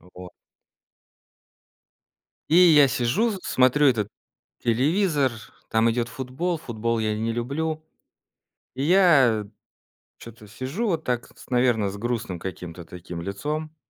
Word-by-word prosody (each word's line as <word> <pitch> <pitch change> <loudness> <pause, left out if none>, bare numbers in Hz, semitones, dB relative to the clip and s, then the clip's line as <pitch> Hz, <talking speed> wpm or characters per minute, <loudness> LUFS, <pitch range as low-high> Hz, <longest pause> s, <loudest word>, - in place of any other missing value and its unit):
Э - - -24
вот. 90 0 -10 2.2
И 165 - +5
я 160 -6 +7
сижу, 135 - +1
с 200 - -4
смотрю 130 +3 +3
этот 110 -6 +2 0.6
телевизор, 145 - +2 0.4
там 110 +1 +3
идет 120 0 -1
футбол, 135 +8 -3
футбол 115 -2 -2
я 110 -1 -1
не 115 +1 -1
люблю. 155 +7 -3 0.9
И 135 +2 -2
я 140 - +4 0.7
чё-то 115 -2 -13
сижу 130 - -4
вот 165 -5 -1
так, 125 -4 -4
с - - -15
наверно, 120 -5 +2
с 100 - -7
грустным 115 -5 -3
каким-то 90 -2 -7
таким 85 0 -8
лицом. 150 - -4
125 Hz, 125 wpm, -24 LUFS, 110-155 Hz, 2.2 s, я